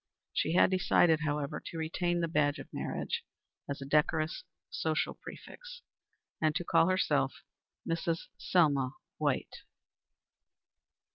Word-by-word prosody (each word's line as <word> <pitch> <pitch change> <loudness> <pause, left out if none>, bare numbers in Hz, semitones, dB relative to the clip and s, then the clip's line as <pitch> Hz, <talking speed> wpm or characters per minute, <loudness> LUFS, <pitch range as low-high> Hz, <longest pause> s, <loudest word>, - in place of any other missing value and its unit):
She 160 - +1
had 185 - +5
decided, 175 -3 +4
however, 150 -2 -2
to 165 - -7
retain 175 +2 0
the 170 - +1
badge 145 -3 +2
of - - -8
marriage - - -3 0.5
as 140 0 -4
a - - -7
decorous 155 +3 +1 0.3
social 475 - 0
prefix, - - -11 0.6
and 155 -1 +2
to 175 - 0
call 165 - +4
herself 155 -7 +1 0.4
Mrs. 165 0 0
Selma 140 -7 +2 0.3
White. - - -1
160 Hz, 120 wpm, -32 LUFS, 150-175 Hz, 0.6 s, had